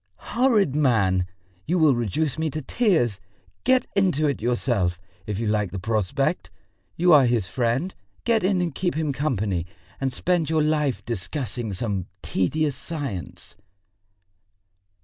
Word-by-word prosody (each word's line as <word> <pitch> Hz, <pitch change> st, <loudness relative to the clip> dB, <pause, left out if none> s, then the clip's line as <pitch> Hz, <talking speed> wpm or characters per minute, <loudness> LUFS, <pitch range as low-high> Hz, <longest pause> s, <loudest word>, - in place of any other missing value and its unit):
"Horrid 225 Hz, -, +3 dB
man! 100 Hz, -11 st, +2 dB, 0.4 s
You 175 Hz, +4 st, +2 dB
will 155 Hz, -4 st, +5 dB
reduce 130 Hz, +7 st, -1 dB
me 160 Hz, 0 st, 0 dB
to 155 Hz, +2 st, -4 dB
tears! 145 Hz, -, +1 dB, 0.4 s
Get 255 Hz, 0 st, +3 dB
into 180 Hz, -7 st, +2 dB
it 140 Hz, -5 st, 0 dB
yourself, 115 Hz, -7 st, 0 dB, 0.3 s
if 105 Hz, -2 st, -2 dB
you 115 Hz, -, -2 dB
like 105 Hz, -2 st, +1 dB
the 100 Hz, -, -5 dB
prospect. 105 Hz, 0 st, -1 dB, 0.5 s
You 175 Hz, 0 st, +5 dB
are 140 Hz, -4 st, +7 dB
his 120 Hz, -5 st, +1 dB
friend, 125 Hz, -, 0 dB, 0.3 s
get 230 Hz, -3 st, +2 dB
in 185 Hz, -1 st, +2 dB
and 170 Hz, -4 st, -1 dB
keep 175 Hz, +2 st, -1 dB
him 155 Hz, -2 st, 0 dB
company, 105 Hz, -, -1 dB, 0.3 s
and 135 Hz, -1 st, 0 dB
spend 170 Hz, +1 st, 0 dB
your 160 Hz, -1 st, +2 dB
life 150 Hz, -3 st, 0 dB
discussing 115 Hz, -, -3 dB
some 95 Hz, -1 st, -2 dB, 0.2 s
tedious 145 Hz, -, 0 dB
science...." 140 Hz, -, -6 dB
135 Hz, 140 wpm, -24 LUFS, 105-160 Hz, 0.5 s, are